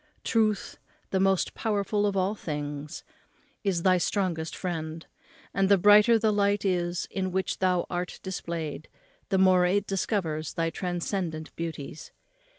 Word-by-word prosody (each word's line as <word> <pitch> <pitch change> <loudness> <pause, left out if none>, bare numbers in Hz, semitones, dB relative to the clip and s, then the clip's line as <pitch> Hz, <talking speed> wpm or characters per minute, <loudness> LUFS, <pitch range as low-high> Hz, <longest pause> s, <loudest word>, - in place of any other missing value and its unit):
Truth, 215 -4 0 0.3
the 190 - +1
most 190 -1 +2
powerful 205 -1 0
of 200 -1 -1
all 190 +2 +1
things, 150 -5 -5 0.6
is 185 -4 0
thy 185 -1 +4
strongest 170 -3 -1
friend; 165 -3 -4 0.5
and 195 -1 +2
the 200 - +6
brighter 210 +4 +7
the 220 -1 +2
light 200 0 +1
is 175 -2 0
in 190 -1 -2
which 190 +1 -1
thou 180 -2 +2
art 180 0 -4
displayed, 170 -5 -4 0.4
the 195 - +2
more 185 -1 +5
it 200 +2 +1
discovers 175 -6 -2
thy 165 -2 0
transcendent 175 -3 -3
beauties. 160 -3 -6
185 Hz, 140 wpm, -27 LUFS, 165-200 Hz, 0.6 s, brighter